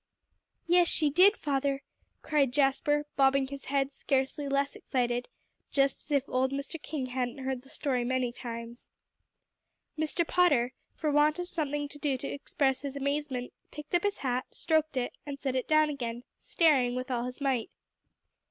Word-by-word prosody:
"Yes, 350 0 +5
she 300 -3 +2
did, 375 +7 +6
father," 275 -1 -1 0.4
cried 285 -4 +2
Jasper, 295 +2 +2
bobbing 270 -1 +3
his 280 0 -7
head 275 0 0
scarcely 270 +1 -1
less 280 0 0
excited, 245 -2 -1 0.4
just 275 -1 +1
as - - -24
if 280 -3 +2
old 260 +1 +1
Mr. 280 +3 -4
King 290 -4 -3
hadn't 250 0 -2
heard 265 -1 -3
the 270 - -19
story 260 -5 -1
many 255 0 0
times. 235 0 -8 1.1
Mr. 315 +2 0
Potter, 285 -9 +3 0.2
for 305 -2 -1
want 295 +2 +4
of 355 0 -3
something 295 -3 -1
to 290 +1 -11
do 280 -3 0
to - - -5
express 275 -1 -1
his 280 -1 -5
amazement, 280 -2 -2 0.2
picked 300 +1 -10
up 350 - +4
his 405 +1 0
hat, 250 -1 -1
stroked 315 -3 0
it, 245 -1 -2
and 285 -1 -6
set 265 -1 -2
it 255 - -1
down 310 -1 +4
again, 240 -4 -4
staring 265 -7 +2
with 255 +1 -4
all 240 -1 0
his 250 +2 -6
might. 265 -5 0
275 Hz, 170 wpm, -30 LUFS, 255-295 Hz, 1.1 s, did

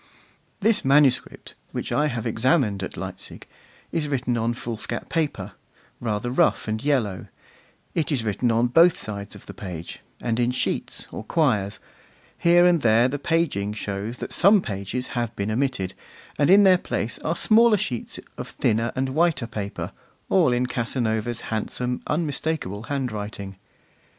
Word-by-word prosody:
This 215 +1 +3
manuscript, 135 -1 +2 0.2
which - - -4
I 150 +1 +2
have 120 -5 -3
examined 115 - +2
at 95 - -6
Leipzig, - - -6 0.5
is 160 -3 -1
written 130 -3 0
on 115 +1 0
foolscap 115 -2 -5
paper, 160 -3 -1 0.5
rather 115 +1 -2
rough 125 - +2
and 110 +2 -2
yellow; 120 -10 0 0.7
it 160 -2 -1
is 130 -6 0
written 110 +3 0
on 115 +1 +3
both 165 +8 +5
sides 100 -1 -5
of - - -13
the - - -9
page, 90 -4 -7 0.2
and 115 -1 -1
in 120 0 +2
sheets 125 - -2
or - - -6
quires; 110 - +1 0.6
here 175 +1 +5
and 175 -3 +4
there 115 +1 +5
the 145 +2 -3
paging 140 -11 0
shows 105 +2 -4
that - - -5
some 200 +4 +6
pages 105 - -4
have 120 -2 -2
been 100 +2 -2
omitted, 110 -6 -1 0.4
and 145 - +2
in 200 +2 +8
their 185 -2 +6
place 115 - -3
are 165 - -1
smaller 225 +3 +5
sheets 130 - -3 0.2
of - - -4
thinner 115 +1 0
and 130 +1 0
whiter 155 -2 +2
paper, 105 -3 -5 0.4
all 170 -9 +4
in 125 +1 +1
Casanova's 120 -2 -1
handsome, 125 +3 -2
unmistakable 150 - -2
handwriting. 105 -7 -4
125 Hz, 150 wpm, -24 LUFS, 110-150 Hz, 0.7 s, in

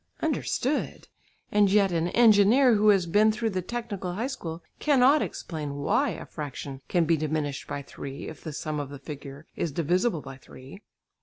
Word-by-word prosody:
Understood? 295 -2 -1 0.4
And 205 -2 +4
yet 200 -2 +4
an 165 0 0
engineer 230 +4 +5
who 215 0 +4
has 195 -4 +4
been 210 +5 +4
through 225 0 -2
the 185 -1 -1
technical 200 -3 -4
high 220 +6 -2
school 170 - -6 0.2
cannot 285 0 +4
explain 150 -4 -5
"why" 140 0 +1
a - - -6
fraction 140 -2 -7
can 175 -2 +2
be 165 +1 +3
diminished 150 -2 -2
by 140 - -4
three 135 0 -8
if 160 - -10
the 155 - -5
sum 150 +1 -4
of 145 -2 -4
the 140 - -8
figures 140 +1 -9
is 165 - -2
divisible 175 - 0
by 135 -1 -10
three. 135 +7 -13
175 Hz, 175 wpm, -27 LUFS, 145-215 Hz, 0.4 s, engineer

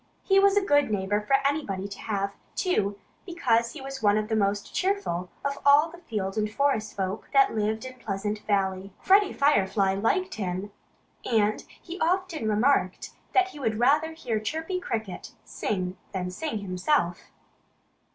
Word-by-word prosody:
He 390 0 +4
was 400 0 +4
a 400 - +3
good 290 - +3
neighbor 205 0 0
for 240 +6 +2
anybody 240 -10 -1
to 200 - -9
have, 200 -2 -2 0.2
too, 205 - 0 0.3
because 235 - +1
he 305 - -9
was 270 -1 -7
one 205 -1 +4
of 215 +1 -2
the 220 - +1
most 205 -1 0
cheerful 370 - -1 0.2
of 280 0 -1
all 290 +3 +5
the 345 - -12
field 210 - -3
and 215 0 0
forest 220 -5 0
folk 190 +2 -3
that 275 -1 +5
lived 220 +2 -1
in 255 -1 -9
Pleasant 210 -1 -3
Valley. 195 -1 0
Freddie 400 +1 +4
Firefly 200 -8 +2
liked 365 - 0
him. 190 0 -4 0.5
And 215 -3 +1 0.2
he 355 +1 -8
often 345 - 0
remarked 215 -3 +1 0.2
that 380 0 +4
he 300 - -11
would 225 -5 -1
rather 300 +7 +3
hear 240 -9 -2
Chirpy 320 - -3
Cricket 220 - -5
sing 185 -2 -3 0.2
than 180 -1 -3
sing 295 - -3
himself. 185 - -1
220 Hz, 160 wpm, -27 LUFS, 200-300 Hz, 0.5 s, all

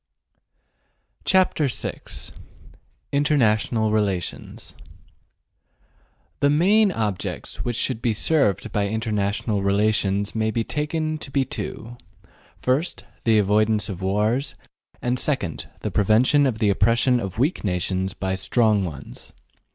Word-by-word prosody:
CHAPTER 185 -5 +3
VI 125 - -4 1.1
INTERNATIONAL 115 -6 +2
RELATIONS 100 -5 -2 1.7
THE 145 - +3
main 195 +8 +4
objects 105 - -3
which 120 -1 -2
should 125 0 -1
be 120 - +1
served 110 -1 +1
by 100 -1 0
international 105 -1 -1
relations 100 0 +1
may 110 -1 0
be 115 +1 -1
taken 155 +3 -2
to 135 - -7
be 135 0 +1
two: 120 -1 -6 0.7
First, 135 +7 0 0.2
the 115 -2 +4
avoidance 105 +1 +2
of 95 -2 -6
wars, 105 +8 0 0.5
and, 125 +1 0
second, 135 - -1
the - - -3
prevention 125 +8 +4
of 120 -4 -1
the 105 -2 +2
oppression 120 +5 +3
of 95 -4 -5
weak 140 +9 0
nations 95 0 -1
by 95 -1 -2
strong 105 +1 +2
ones. 80 -6 -8
110 Hz, 115 wpm, -23 LUFS, 100-135 Hz, 1.7 s, main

